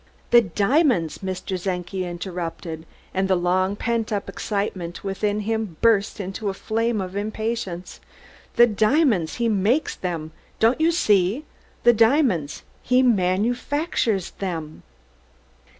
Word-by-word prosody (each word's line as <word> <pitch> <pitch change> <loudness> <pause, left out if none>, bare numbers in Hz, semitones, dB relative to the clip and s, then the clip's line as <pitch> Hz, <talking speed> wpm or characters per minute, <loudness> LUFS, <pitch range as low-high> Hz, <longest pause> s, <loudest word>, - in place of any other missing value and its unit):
"The 240 - +8
diamonds!" 200 - +1
Mr. 185 -1 -4
Czenki 185 0 -3
interrupted, 170 -2 -6 0.3
and 190 +1 +1
the 190 - +3
long 185 +2 +1
pent 230 +1 -1
up 205 -2 -2
excitement 195 -4 -3
within 205 +2 -1
him 220 -5 -2
burst 220 -3 +2
into 195 +2 -3
a 190 - -4
flame 225 +2 -1
of 185 0 -5
impatience. 215 -3 -4 0.6
"The 240 - +8
diamonds! 220 - +2
He 235 -1 0
makes 220 +8 +1
them! 165 -4 -4 0.3
Don't 230 +7 +3
you 325 - +4
see? 215 - +2 0.4
Diamonds! 230 - +3 0.2
He 255 +1 +3
manufactures 225 - +1
them!" 165 -5 -4
200 Hz, 120 wpm, -23 LUFS, 180-230 Hz, 0.6 s, The